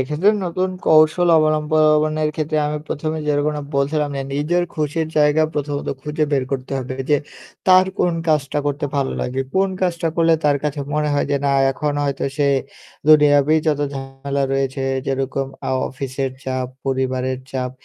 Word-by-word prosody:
এক্ষেত্রে 150 +9 +2
নতুন 185 +2 -1 0.2
কৌশল 155 +3 +5
অবলম্বনের 155 0 +2
ক্ষেত্রে 155 0 -2
আমি 150 0 -2
১ম 155 +2 -2
এ - - -4
যেরকম 150 +1 +1 0.2
বলছিলাম 145 +1 0
না 135 - -2
নিজের 160 +5 +1
খুশির 155 +1 -1
জায়গা 150 +1 +4
প্রথমত 145 -1 -3
খুঁজে 150 +1 -1
বের 135 -2 +2
করতে 135 0 -4
হবে 130 0 -5 0.2
যে 145 - +6 0.5
তার 185 0 +6
কোন 175 - +2 0.2
কাজটা 150 -1 +1
করতে 145 +1 -1
ভালো 135 -1 0
লাগে 130 +2 -2
কোন 195 +1 +3
কাজটা 170 -2 0
করলে 165 -1 +4
তার 145 -1 +4
কাছে 150 -1 -2
মনে 150 0 +1
হয় 145 - +1
যে 140 - +2
না - - +3 0.2
এখন 150 +2 -2
হয়তো 140 -1 -2
সে 145 - +2 0.6
দুনিয়াতেই 150 0 +6
যত 150 -2 +1
ঝামেলা 135 +1 -4
রয়েছে 135 0 -1 0.2
যেরকম 135 0 -1 0.2
আউ 130 - +1
অফিসের 135 0 -4
চাপ, 130 -1 -2 0.2
পরিবারের 130 -1 -1
চাপ 130 -1 -2
145 Hz, 160 wpm, -20 LUFS, 135-155 Hz, 0.6 s, যে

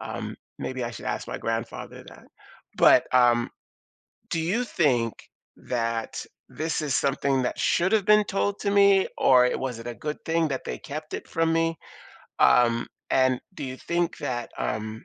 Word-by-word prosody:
Um, - - -5 0.2
maybe 130 -1 -4
I 120 - -3
should - - -9
ask - - -3
my - - -4
grandfather 115 0 -5
that. - - -14 0.5
But, - - +6
um, 120 -1 +4 0.8
do 165 - -1
you 195 +10 0
think 130 - +1 0.4
that 115 -2 -3 0.2
this 160 0 -2
is 145 -4 -1
something 135 -1 +1
that 125 - -3
should 180 +3 +2
have 215 -3 +2
been 210 0 +6
told 200 0 -1
to 200 - -1
me 200 -1 +5
or 125 -1 +5
it 125 - 0
was 130 -3 -3
it 115 - -10
a 120 - -4
good 150 +3 -4
thing 165 0 +1
that 135 - -3
they - - -4
kept 155 +1 -7
it - - -5
from 165 0 0
me, 165 0 +1 0.6
um, 120 -1 +4 0.2
and, 130 -1 +3
do 185 - -6
you 130 -1 -6
think 170 +2 -1
that, 120 -2 -4
um, 110 +1 -4
135 Hz, 175 wpm, -26 LUFS, 120-165 Hz, 0.8 s, But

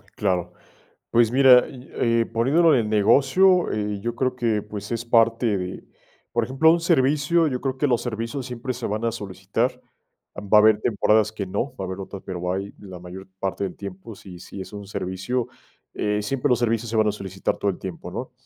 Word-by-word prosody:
Claro. 90 -4 -1 0.6
Pues 115 -1 +4
mira, 130 -1 +6
yo 130 -2 -12
eh, 115 -1 +2
poniendo 125 +10 +1
lo 165 - +6
del 120 -7 +2
negocio, 155 - +4
eh, 105 -1 -2
yo 120 +3 -4
creo 130 0 0
que, 115 -4 0
pues, 105 +1 -8
es 115 0 -3
parte 115 -2 +2
de, 90 0 -5 0.5
por 120 -1 0
ejemplo, 135 +6 +4
un 170 - +2
servicio, 160 0 +2
yo 130 -4 -2
creo 130 0 -3
que 145 - +1
los 120 -3 +1
servicios 115 +2 -4
siempre 125 0 -4
se 125 -1 -4
van 105 +2 -3
a 115 - +1
solicitar, 100 -4 -3 0.6
va 105 +1 +3
a - - +7
haber 110 -1 +5
temporadas 110 -1 +2
que 105 -2 -4
no, 100 +8 -3
va - - -6
a - - -6
haber 95 +1 -6
otras, 95 0 -8
pero 90 -1 -3
hay 95 +2 -4
la 95 -3 -10
mayor 90 +2 -10
parte 95 +1 -2
del 95 - -6
tiempo, 100 +2 -9
si 90 -3 -12
si 95 +2 -9
es 95 - -9
un 100 -1 -8
servicio, 100 +5 -3 0.5
eh, 105 0 -1
siempre 135 +5 -1
los 125 - +3
servicios 115 -1 0
se 115 - -4
van 110 0 +3
a - - +2
solicitar 95 -2 -3
todo 100 - 0
el 90 - -10
tiempo, 90 -2 -7
¿no?, 125 +7 -6
110 Hz, 210 wpm, -23 LUFS, 100-125 Hz, 0.6 s, a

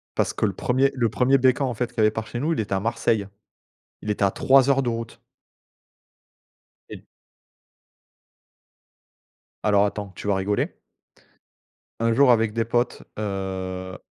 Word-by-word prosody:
Parce - - 0
que - - 0
le - - -1
1er 135 +2 +1
le 120 -3 +1
1er 130 +5 +3
BK, 130 +1 +2
en 130 -3 0
fait, 120 +2 -2
qu'il - - -24
y - - +2
avait 110 - +4
par 110 0 -5
chez 120 - -5
nous, 160 +4 0
il - - -3
était 100 -2 -2
à 95 - +1
Marseille. 110 -1 0 0.8
Il 105 - -4
était 100 -1 0
à 95 - +3
3 135 +4 +4
heures 135 0 +3
de 120 - -2
route. 115 0 -5 1.7
Et - - -7
d - - -20 2.6
Alors, 105 -1 +4
attends, 100 -1 -4
tu - - -7
vas 100 - +2
rigoler 100 +2 -1 1.2
un 115 0 +2
jour, 135 +1 +5
avec 110 -2 +3
des 115 0 0
potes, 120 +1 -1
heu, 95 -2 -4
115 Hz, 165 wpm, -24 LUFS, 100-125 Hz, 2.6 s, jour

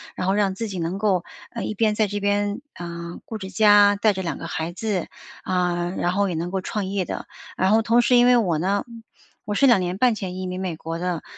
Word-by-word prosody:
然 185 - -3
后 190 - +2
让 200 -2 +1
自 225 +3 -3
己 190 -3 -5
能 170 +3 -2
够， 195 -4 +1 0.3
呃， 230 - -5
一 - - -3
边 215 0 +1
在 215 0 +2
这 205 +1 -3
边， 205 +2 0
呃， 170 0 -7
顾 220 - -6
着 190 -1 -7
家 205 0 +6
带 210 +1 +2
着 190 - -4
2 170 - -3
个 - - -7
孩 160 0 -3
子， 205 -3 -2 0.4
啊， 175 -1 0
然 175 - 0
后 200 0 +1
也 175 - -3
能 170 +2 -3
够 190 0 -1
创 205 +1 -3
业 195 0 -1
的。 - - -5 0.3
然 190 +1 +2
后 220 +1 +5
同 230 +2 +3
时 250 - +4
因 245 0 +6
为 250 0 +6
我 180 -9 +1
呢， 195 +4 0 0.6
我 205 - -3
是 275 - +4
2 240 -6 +6
年 180 0 -2
半 245 +2 +4
前 190 -4 -5
移 185 - -4
民 185 0 -4
美 180 -3 -3
国 165 +1 -5
的， 175 -3 -2
195 Hz, 260 characters per minute, -23 LUFS, 180-210 Hz, 0.6 s, 家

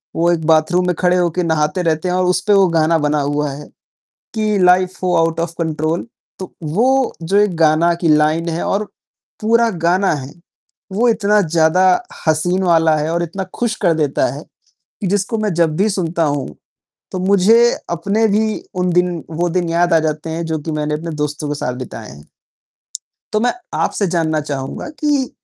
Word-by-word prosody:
वो 170 +1 +2
एक 165 -2 -1
बाथरूम 165 +3 +3
में 180 - 0
खड़े 180 0 +2
होकर 175 0 0
नहाते 155 0 0
रहते 160 +1 0
हैं 180 - 0
और 185 0 +1
उसपे 185 +3 +1
वो 195 -1 +5
गाना 160 +1 +3
बना 150 -1 0
हुआ 145 +1 -1
है 145 +2 -9 0.7
कि 215 -2 0
लाइफ़ 180 0 +3
हो 180 - +1
आउट 165 0 +1
ऑफ़ 170 0 -2
कंट्रोल। 160 +3 -2 0.3
तो 185 - -8
वो 245 - +1
जो 190 +5 +1
एक 205 -3 +2
गाना 160 +1 +3
की 170 - +1
लाइन 155 +2 +1
है 165 +1 -3
और 200 +2 0 0.6
पूरा 230 +2 +3 0.2
गाना 185 +3 +2
है, 140 -2 -6 0.6
वो 225 +6 +1
इतना 210 -2 +2
ज़्यादा 165 +1 +2 0.4
हसीन 175 +4 +1
वाला 165 -3 +3
है 150 +1 -2
और 170 0 0
इतना 190 +3 -4 0.2
ख़ुश 235 -2 0
कर 175 -5 +3
देता 150 -3 0
है 145 - -8 0.6
कि 205 - -2
जिसको 205 +4 -1
मैं 215 -2 -1
जब 160 -2 +1
भी 200 +5 +2
सुनता 170 -3 -1
हूँ 145 -2 -1 0.6
तो 185 - -3
मुझे 200 +4 +4 0.3
अपने 200 +7 0
भी 215 +1 0 0.2
उन 180 - +1
दिन 180 -2 0
वो 170 +2 -1
दिन 175 0 -1
याद 170 +1 +1
आ - - +6
जाते 155 0 -3
हैं 165 +1 -3
जो 160 -1 -2
कि 160 - -5
मैंने 150 0 -2
अपने 165 +2 -5
दोस्तों 150 0 -3
के 145 - -2
साथ 125 -3 -3
बिताए 115 -3 -10
हैं। 75 +1 -15 1.0
तो 215 - +1
मैं 245 +2 +2 0.3
आपसे 200 - 0
जानना 160 -2 0
चाहूँगा 140 - -5
कि 290 -4 0
170 Hz, 190 wpm, -17 LUFS, 155-190 Hz, 1.0 s, आ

